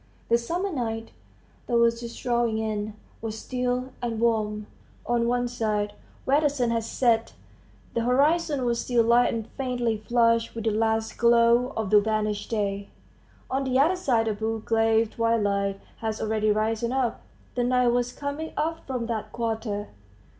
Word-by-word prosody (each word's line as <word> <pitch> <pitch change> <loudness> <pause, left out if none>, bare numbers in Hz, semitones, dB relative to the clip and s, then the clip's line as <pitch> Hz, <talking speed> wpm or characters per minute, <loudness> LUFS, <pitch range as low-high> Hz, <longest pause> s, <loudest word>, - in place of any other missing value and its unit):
The 235 - +5
summer 355 +11 -2
night, 225 -4 -3 0.6
that 240 - +2
was 235 0 +3
just 235 0 -7
drawing 240 -3 +1
in, 215 -1 -2 0.3
was 220 -1 -4
still 250 +2 -2
and 230 -2 -2
warm; 215 -2 0 0.4
on 235 -1 +1
one 245 0 +1
side, 215 -4 -1 0.3
where 280 +3 +3
the 295 - +3
sun 250 -4 0
had 230 -1 0
set, 230 -1 +1 0.6
the 235 - 0
horizon 285 +3 +2
was 235 -1 +1
still 240 -2 +2
light 235 +2 +4
and 225 -2 -3
faintly 245 -4 -1
flushed 230 +1 +2
with 225 - -4
the 225 - +1
last 220 +1 0
glow 235 +2 +4
of 220 -3 -2
the 210 -1 +7
vanished 215 -1 -1
day; 200 -2 -2 0.6
on 270 +1 -1
the 260 -1 +1
other 315 +7 +4
side 245 -11 +1
a 220 - +1
blue 220 +1 -2
gray 225 0 +3
twilight 205 -4 0 0.2
had 220 -1 -3
already 215 0 0
risen 220 +2 0
up. 255 -3 0 0.3
The 245 - 0
night 250 0 +3
was 245 0 +1
coming 285 +4 -5
up 320 +2 -2
from 250 -3 -2
that 230 -2 -4
quarter. 220 -3 -3
230 Hz, 165 wpm, -26 LUFS, 220-245 Hz, 0.6 s, the